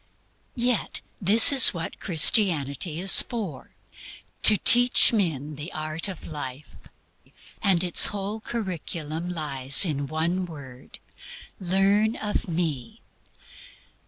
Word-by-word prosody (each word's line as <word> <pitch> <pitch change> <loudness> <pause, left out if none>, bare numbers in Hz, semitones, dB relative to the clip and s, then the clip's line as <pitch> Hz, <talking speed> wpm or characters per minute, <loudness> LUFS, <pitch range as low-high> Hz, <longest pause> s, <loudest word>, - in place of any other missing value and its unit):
Yet 245 -1 -4 0.2
this 210 +8 +7
is 260 -8 +6
what 165 -1 -9
Christianity 160 - +1
is 190 +2 +6
for 200 - -10 0.7
to 215 - +8
teach 245 +4 +5
men 155 - -5
THE 150 +4 -10
ART 155 +3 -7
OF 190 -4 -11
LIFE. 145 -2 -10 0.9
And 190 -4 0
its 175 -2 +4
whole 205 +1 -8
curriculum 175 -7 -8
lies 140 -3 0
in 145 -4 -5
one 170 +5 -5
word 135 -6 -15 0.6
"Learn 195 +4 -2
of 210 -2 -7
me." 160 -8 -7
170 Hz, 105 wpm, -21 LUFS, 150-200 Hz, 0.9 s, to